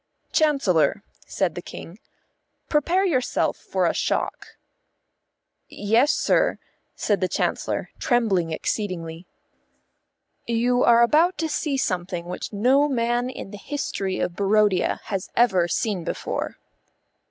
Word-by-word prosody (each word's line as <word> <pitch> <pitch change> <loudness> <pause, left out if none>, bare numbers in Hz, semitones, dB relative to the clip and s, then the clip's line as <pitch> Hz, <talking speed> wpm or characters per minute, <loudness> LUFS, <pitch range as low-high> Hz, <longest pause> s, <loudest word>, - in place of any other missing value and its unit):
"Chancellor," 215 - +2 0.2
said 185 -4 -1
the 175 - -6
King, 175 +3 -10 0.7
"prepare 345 +6 +2
yourself 260 -9 +1
for - - -2
a - - +2
shock." - - -2 1.1
"Yes, 230 +8 +2
sir," - - +2 0.4
said 205 -2 0
the 185 - +2
Chancellor, - - -2
trembling 200 -9 +1
exceedingly. 170 -2 -3 1.2
"You 245 +2 +2
are 235 0 +6
about 325 +9 +3
to 320 +1 -1
see 295 -2 -1
something 180 -6 -2
which 180 - -6
no 260 +8 +3
man 240 -1 0
in 195 - -8
the 205 - -9
history 195 -8 -3
of 175 - -2
Barodia 205 -1 +2
has 195 -4 -4
ever 190 -8 +3
seen 185 +2 -1
before." - - -4
215 Hz, 120 wpm, -24 LUFS, 185-260 Hz, 1.2 s, are